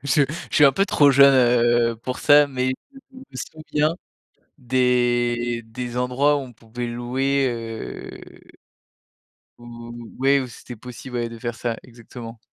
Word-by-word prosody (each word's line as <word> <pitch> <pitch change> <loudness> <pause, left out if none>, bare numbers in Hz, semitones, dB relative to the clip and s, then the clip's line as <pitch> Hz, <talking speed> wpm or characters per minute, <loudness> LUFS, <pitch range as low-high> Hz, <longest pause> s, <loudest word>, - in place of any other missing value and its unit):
je 140 +1 +3 0.3
je - - -6
suis 150 - +6
un 140 - +8
peu 195 +6 +1
trop 145 -6 +5
jeune, 140 0 +7
heu, 120 -2 +3
pour 125 +3 -6
ça, 145 0 +6
mais 130 -2 -2 0.4
je 260 - -12
me 265 - -13
souviens 155 +4 -2 0.7
des 120 -2 +1
des 120 +2 -6
endroits 125 +4 +2
où - - -3
on 125 -3 -10
pouvait 115 +2 -7
louer, 130 +3 0
heu 115 -1 -8 1.0
où, 120 0 -10 0.3
ouais, 135 +1 +3
où 130 - -4
c'était 120 +1 -11
possible, 125 +2 -9
ouais, 120 -1 -1
de 115 0 -10
faire 120 0 -4
ça. 115 0 -3
Exactement. 115 -1 -11
125 Hz, 155 wpm, -22 LUFS, 120-135 Hz, 1.0 s, un